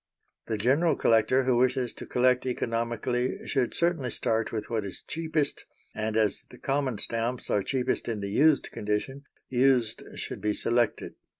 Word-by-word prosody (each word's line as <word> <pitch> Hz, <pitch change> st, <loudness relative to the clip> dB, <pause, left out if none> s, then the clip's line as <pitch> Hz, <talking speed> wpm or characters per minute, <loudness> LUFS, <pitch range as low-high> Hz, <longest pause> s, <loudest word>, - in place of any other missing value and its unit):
The 110 Hz, -, -1 dB
general 140 Hz, +10 st, +3 dB
collector 115 Hz, +4 st, +3 dB
who 130 Hz, -2 st, +2 dB
wishes 125 Hz, 0 st, +1 dB
to -, -, -9 dB
collect 125 Hz, 0 st, +3 dB
economically 120 Hz, +1 st, -1 dB
should 130 Hz, -4 st, 0 dB
certainly 170 Hz, -7 st, +1 dB
start 115 Hz, 0 st, -1 dB
with 110 Hz, -2 st, -3 dB
what 110 Hz, -2 st, -1 dB
is 95 Hz, -3 st, -7 dB
cheapest; 160 Hz, -2 st, -2 dB, 0.3 s
and 110 Hz, 0 st, -2 dB
as 110 Hz, -2 st, +1 dB
the 125 Hz, -, -13 dB
common 135 Hz, -4 st, -1 dB
stamps 115 Hz, +3 st, -2 dB
are 100 Hz, -, +3 dB
cheapest 130 Hz, +4 st, -1 dB
in 115 Hz, -3 st, -2 dB
the 100 Hz, 0 st, -4 dB
used 145 Hz, +5 st, +3 dB
condition, 115 Hz, +6 st, -3 dB, 0.2 s
used 125 Hz, -3 st, +2 dB
should -, -, -5 dB
be 105 Hz, -1 st, 0 dB
selected. 120 Hz, -1 st, 0 dB
125 Hz, 160 wpm, -28 LUFS, 110-130 Hz, 0.3 s, general